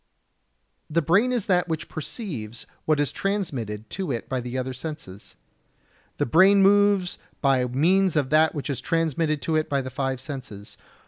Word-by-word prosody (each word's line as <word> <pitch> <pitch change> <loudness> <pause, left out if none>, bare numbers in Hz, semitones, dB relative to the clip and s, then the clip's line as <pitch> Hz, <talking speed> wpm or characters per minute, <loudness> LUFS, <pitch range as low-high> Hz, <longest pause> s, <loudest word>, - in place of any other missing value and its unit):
The 165 +1 +1
brain 200 - +3
is 240 -5 0
that 180 -4 +2
which 160 -2 -3
perceives 140 - -6 0.2
what 155 -2 +2
is 145 -4 +1
transmitted 130 - -3
to 185 -6 -3
it 115 -2 -4
by 130 -1 -2
the 125 +1 -5
other 130 0 -3
senses. 130 - -8 0.8
The - - +1
brain 195 - +5
moves 200 -2 +3 0.2
by 135 -3 +2
means 170 +9 +2
of 145 -3 0
that 155 +1 +4
which 145 0 -3
is 130 - -3
transmitted 160 -2 0
to 160 - 0
it 155 0 0
by 140 -1 +1
the 130 0 -6
five 130 0 -2
senses. 130 -7 -8
150 Hz, 170 wpm, -25 LUFS, 130-180 Hz, 0.8 s, brain